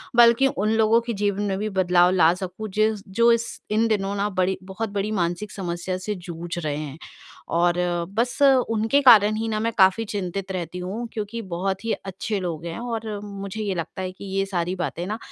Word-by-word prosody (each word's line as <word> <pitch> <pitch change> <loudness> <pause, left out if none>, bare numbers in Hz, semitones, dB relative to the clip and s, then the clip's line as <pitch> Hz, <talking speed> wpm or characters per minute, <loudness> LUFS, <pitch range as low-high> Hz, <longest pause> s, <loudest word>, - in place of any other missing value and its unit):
बल्कि 235 +2 +6
उन 215 -4 0
लोगों 225 +1 +4
के 235 0 -4
जीवन 205 -1 -1
में 195 -2 -1
भी 215 +2 -2
बदलाव 180 -2 +3
ला 175 -3 +5
सकूँ 190 +3 -6
जिस 215 -1 +1
जो 230 +5 +4
इस 230 0 -1
इन 220 +2 +3
दिनों 200 -2 0
ना 205 +1 0
बड़ी 185 -1 0
बहुत 200 +4 -4
बड़ी 200 +1 -2
मानसिक 175 +5 -2
समस्या 180 -1 -3
से 205 +3 -4
जूझ 175 -1 -6
रहे 150 -3 -2
हैं। 150 -1 -6 0.6
और 175 0 +3 0.4
बस 240 +2 0
उनके 255 -1 +3
कारण 215 -5 +7
ही 225 +1 -2
ना 215 -1 -1
मैं 230 +1 0
काफ़ी 190 +2 +5
चिंतित 195 -1 -4
रहती 180 -1 -4
हूँ 200 +7 -4
क्योंकि 220 +1 -4
बहुत 190 +2 -2
ही 230 - 0
अच्छे 195 +2 -4
लोग 170 -3 -4
हैं 170 +3 -5
और 225 -3 -4
मुझे 200 +1 -6
ये 200 -2 -1
लगता 170 +2 -5
है 185 0 -3
कि 190 +2 -11
ये 195 - +2
सारी 180 -2 -2
बातें 175 -1 -3
ना 215 +2 -3
200 Hz, 205 wpm, -24 LUFS, 180-220 Hz, 0.6 s, कारण